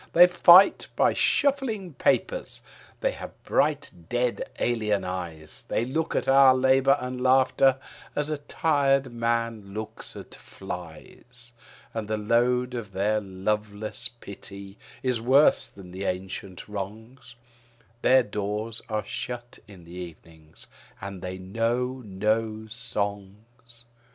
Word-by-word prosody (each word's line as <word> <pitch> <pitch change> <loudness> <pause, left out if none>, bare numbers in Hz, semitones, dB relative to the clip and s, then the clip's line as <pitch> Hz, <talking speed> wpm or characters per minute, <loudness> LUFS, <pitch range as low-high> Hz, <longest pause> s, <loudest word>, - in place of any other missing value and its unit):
They 175 +1 +9
fight 180 +1 +7
by - - +3
shuffling 255 - +1
papers; - - 0 0.4
they - - +2
have - - -8
bright 145 -1 +1 0.2
dead 120 0 -1
alien 110 -4 0
eyes; 85 -4 -6
They 115 - 0
look 160 +6 -2
at - - 0
our 135 -1 +7
labour 135 +1 +4
and 125 0 -5
laughter 130 +1 +4 0.4
as 150 0 0
a 155 -1 -3
tired 140 -4 +1
man 115 -3 -2
looks 110 0 -7
at - - -10
flies. 100 +7 -10 0.4
And 110 -2 -4
the 110 0 -1
load 125 +3 +1
of 110 -5 -6
their 105 +3 +1
loveless 105 +4 -2
pity 100 -4 -10 0.3
is 125 -3 0
worse 135 +5 +4
than 95 -2 -13
the 95 +2 -5
ancient 95 0 -5
wrongs, 110 +6 -8 0.7
Their 130 0 +5
doors 105 +1 -3
are 105 -2 -2
shut 120 +1 -6
in 95 -4 -14
the 85 +1 -13
evening; 80 -3 -11 0.4
and 95 -1 -7
they 90 0 -5
know 115 +7 -1
no 110 +2 -1
songs. 115 +1 -6
115 Hz, 125 wpm, -26 LUFS, 100-130 Hz, 0.7 s, They